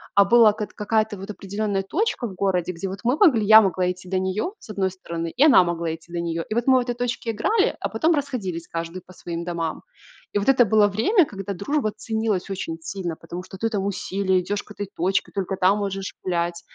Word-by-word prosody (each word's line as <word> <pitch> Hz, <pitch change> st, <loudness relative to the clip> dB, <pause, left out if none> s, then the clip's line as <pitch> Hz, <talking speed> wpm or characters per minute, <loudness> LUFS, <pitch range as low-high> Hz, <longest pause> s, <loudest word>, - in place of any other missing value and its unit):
а 200 Hz, 0 st, +7 dB
была 230 Hz, 0 st, +6 dB
как 210 Hz, 0 st, -5 dB
т -, -, -23 dB
какая-то 215 Hz, +1 st, 0 dB
вот 195 Hz, +2 st, -9 dB
определенная 200 Hz, 0 st, -2 dB
точка 335 Hz, -, -1 dB
в 190 Hz, -, -9 dB
городе, 180 Hz, -2 st, 0 dB
где 180 Hz, +3 st, -5 dB
вот 190 Hz, +1 st, -6 dB
мы 245 Hz, +3 st, +3 dB
могли, 280 Hz, -, +5 dB
я 220 Hz, +1 st, +9 dB
могла 185 Hz, -2 st, +1 dB
идти 180 Hz, 0 st, -10 dB
до 190 Hz, 0 st, +1 dB
нее 190 Hz, -, -1 dB
с -, -, -16 dB
одной 195 Hz, -3 st, -1 dB
стороны, 170 Hz, -2 st, -5 dB
и 260 Hz, -, +2 dB
она 270 Hz, -11 st, +7 dB
могла 170 Hz, -2 st, -2 dB
идти 165 Hz, +1 st, -18 dB
до 170 Hz, -, -2 dB
нее. 165 Hz, -1 st, -3 dB
И -, -, -1 dB
вот 235 Hz, +2 st, 0 dB
мы 260 Hz, -1 st, +6 dB
в -, -, +1 dB
этой 245 Hz, 0 st, -3 dB
точке 240 Hz, -1 st, -2 dB
играли, 390 Hz, -, +1 dB
а -, -, -2 dB
потом 325 Hz, +2 st, +2 dB
расходились 220 Hz, -, -3 dB
каждый 165 Hz, +2 st, -5 dB
по 185 Hz, -, -15 dB
своим 170 Hz, -1 st, -6 dB
домам. 170 Hz, -2 st, -3 dB, 0.5 s
И -, -, +1 dB
вот 200 Hz, -, 0 dB
это 255 Hz, -3 st, +6 dB
было 215 Hz, -1 st, +4 dB
время, 280 Hz, -, +3 dB
когда 200 Hz, -4 st, -6 dB
дружба 215 Hz, +5 st, -1 dB
ценилась 220 Hz, -4 st, -2 dB
очень 185 Hz, -4 st, -4 dB
сильно, 175 Hz, -1 st, -4 dB
потому 170 Hz, +2 st, -8 dB
что 185 Hz, +1 st, -11 dB
ты 225 Hz, +4 st, -1 dB
там 200 Hz, -3 st, -2 dB
усилие, 190 Hz, -1 st, 0 dB
идешь 205 Hz, +3 st, -3 dB
к -, -, -17 dB
этой 205 Hz, -1 st, -5 dB
точке, 190 Hz, +3 st, 0 dB
только 195 Hz, -1 st, -2 dB
там 185 Hz, +3 st, +3 dB
можешь 195 Hz, -1 st, -3 dB
гулять. 170 Hz, -1 st, -1 dB
195 Hz, 235 wpm, -23 LUFS, 180-220 Hz, 0.5 s, я